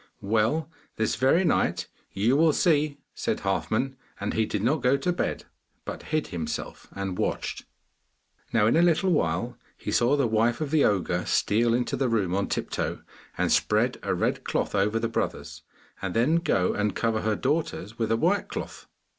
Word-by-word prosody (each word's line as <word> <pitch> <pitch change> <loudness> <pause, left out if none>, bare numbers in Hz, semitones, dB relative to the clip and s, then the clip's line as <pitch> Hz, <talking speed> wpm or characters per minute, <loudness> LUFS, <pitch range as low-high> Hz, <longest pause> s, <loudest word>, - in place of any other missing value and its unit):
'Well, 110 +10 +1 0.3
this 110 - 0
very 135 +8 +3
night - - +1 0.2
you 110 +7 +2
will 155 +1 +4
see!' 150 -4 +2 0.2
said - - -2
Halfman. 110 +7 -1 0.2
And 100 - -2
he 110 -1 +1
did 105 -1 -2
not 140 +5 +2
go 125 +3 +3
to 180 +5 0
bed, - - -2 0.4
but - - -6
hid 155 -1 0
himself 80 -3 -5
and 95 -2 -4
watched. - - -2 0.9
Now 110 -2 +3
in 115 - +3
a 165 - +5
little 175 +2 +3
while 120 - 0 0.2
he - - -5
saw 120 +4 +3
the 140 - +2
wife 115 +1 +2
of 155 -3 -3
the 155 -2 +4
ogre 100 -4 +1
steal 115 +3 +2
into 125 0 -1
the 130 -2 0
room 100 -6 0
on 100 +1 0
tiptoe - - -3 0.3
and - - +1
spread - - +2
a - - -1
red - - -1
cloth - - -1
over 105 +2 +2
the 115 0 0
brothers 115 - -3 0.4
and 95 -2 -3
then 130 +9 +3
go 100 - +1
and 105 -2 -1
cover 115 -2 0
her 110 0 0
daughters 130 - -2
with 115 -1 0
a 115 - +3
white - - +1
cloth. - - -7
115 Hz, 180 wpm, -26 LUFS, 105-145 Hz, 0.9 s, a